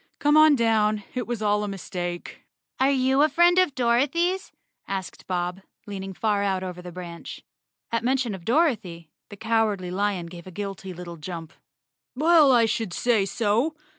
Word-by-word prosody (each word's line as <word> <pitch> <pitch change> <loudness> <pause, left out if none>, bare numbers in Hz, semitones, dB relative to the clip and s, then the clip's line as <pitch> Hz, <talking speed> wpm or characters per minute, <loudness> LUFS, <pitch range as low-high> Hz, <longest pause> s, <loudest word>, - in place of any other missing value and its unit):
Come 295 +1 +3
on 310 -1 +7
down. 215 -3 +2
It 250 -1 -3
was 235 -2 -3
all 210 0 +2
a - - -2
mistake." 175 -3 -6 0.4
"Are 265 - +4
you 265 0 +2
a 305 - +5
friend 350 +2 +4
of 365 -7 +2
Dorothy's?" 290 +10 +1 0.4
asked 190 -2 -5
Bob, 180 +1 -2 0.2
leaning 195 -2 -6
far 210 -1 0
out 190 -2 0
over 180 -1 -6
the 180 0 -9
branch. 170 -1 -9 0.5
At 230 0 0
mention 255 -3 0
of 190 -3 -8
Dorothy, 205 - 0 0.2
the 205 - -10
Cowardly 220 -4 0
Lion 195 -2 -1
gave 170 +1 -11
a 185 - -12
guilty 195 -2 -5
little 175 -1 -8
jump. 165 0 -7 0.6
"Well, 310 0 +5
I 235 -2 +5
should 220 -4 -2
say 225 -3 +2
so. 230 - 0
210 Hz, 165 wpm, -25 LUFS, 185-255 Hz, 0.6 s, on